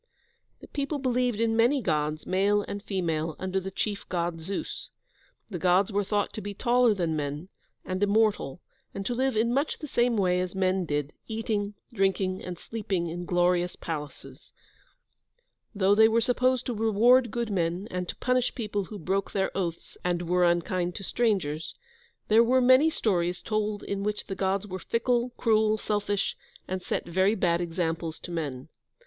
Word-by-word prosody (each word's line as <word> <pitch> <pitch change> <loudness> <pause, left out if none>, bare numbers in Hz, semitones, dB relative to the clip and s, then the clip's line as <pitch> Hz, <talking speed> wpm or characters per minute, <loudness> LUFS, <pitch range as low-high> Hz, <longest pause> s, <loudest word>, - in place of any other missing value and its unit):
The - - -11
people 285 +1 -2
believed 250 -4 0
in 225 -1 +2
many 240 +5 +4
Gods, 155 - -1
male 200 +2 +2
and 200 - -5
female, 165 -6 -2
under 190 0 -1
the 190 0 -5
chief 200 +1 -3
God, 170 -2 -1
Zeus. 200 - -5 0.6
The 180 - -4
Gods 185 +4 +3
were 205 0 +1
thought 205 +1 -1
to 215 - -5
be 205 0 -6
taller 240 0 +3
than 170 -4 -1
men, 150 +4 -4 0.4
and 185 +1 -3
immortal, 205 -7 +2 0.3
and 195 - -4
to 245 - -1
live 260 -1 0
in 230 +2 +2
much 280 +4 0
the 310 - -7
same 240 -4 +1
way 180 -2 +2
as 185 +1 -4
men 185 -1 +1
did, 145 -1 -2
eating, 215 -2 -2 0.2
drinking, 195 -2 0
and 180 -1 -6
sleeping 195 -5 -3
in 175 +2 -5
glorious 175 0 +2
palaces. 145 -3 -7 1.2
Though 195 0 +4
they 220 +1 +7
were 225 +1 +3
supposed 255 +2 +1
to 245 - -2
reward 230 +3 +4
good 235 0 -2
men, 175 +1 -1
and 180 -1 -3
to - - -4
punish 250 0 0
people 205 -4 -2
who 210 - -8
broke 195 +2 -2
their 195 -1 0
oaths 170 -4 -4
and 175 -1 0
were 180 +1 +2
unkind 175 +1 0
to 195 - -6
strangers, 180 -9 -1 0.5
there 220 +2 +6
were 255 +3 +4
many 260 +5 +6
stories 180 - 0
told 215 -1 -1
in 200 0 -3
which 210 +1 -2
the - - -5
Gods 195 +1 0
were 185 -2 -6
fickle, 240 +2 0
cruel, 220 -2 +3
selfish, 205 -1 -1 0.3
and 185 0 -3
set - - -2
very 190 +5 +2
bad 175 -3 +1
examples 165 -1 -2
to 175 - -8
men. 145 -6 -4
195 Hz, 175 wpm, -27 LUFS, 175-225 Hz, 1.2 s, they